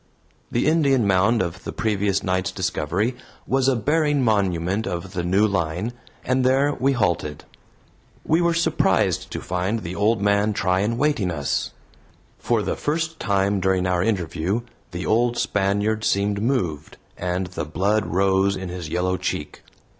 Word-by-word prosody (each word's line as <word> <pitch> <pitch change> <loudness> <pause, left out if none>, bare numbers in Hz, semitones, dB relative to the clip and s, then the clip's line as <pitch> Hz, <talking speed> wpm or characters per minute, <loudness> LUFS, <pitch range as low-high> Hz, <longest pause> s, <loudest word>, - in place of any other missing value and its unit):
The 120 - +1
Indian 140 -6 +3
mound 100 +3 +3
of 85 +1 -6
the - - -5
previous 100 -3 0
night's 95 0 0
discovery 95 +5 -1 0.3
was 135 0 +1
a 135 - +3
bearing 145 +2 +1
monument 100 -2 +1
of 90 +1 -5
the 85 -2 -2
new 95 +5 +3
line, 95 +2 -1 0.3
and 130 0 +1
there 135 +3 +3
we 135 +1 +1
halted. 85 - -1 0.8
We 160 +2 +3
were 170 -1 +2
surprised 170 - +1
to - - -4
find 95 +5 -2
the 85 -1 -5
old 105 +3 +2
man 100 +1 +2
Tryan 100 +4 0
waiting 140 -10 +1
us. 75 -5 -1 0.7
For - - 0
the - - -1
first 160 +2 -2
time 100 0 +1
during 95 0 +1
our 90 -1 +1
interview 90 +1 -1 0.3
the 90 -1 -5
old 120 +2 +2
Spaniard 100 +2 0
seemed 100 -1 +1
moved, 90 - -1 0.2
and 90 +1 -2
the 90 -2 -5
blood 95 +8 0
rose 95 +1 +2
in 95 -1 -5
his 90 -3 -6
yellow 90 +2 0
cheek. - - -4
100 Hz, 155 wpm, -23 LUFS, 90-115 Hz, 0.8 s, Indian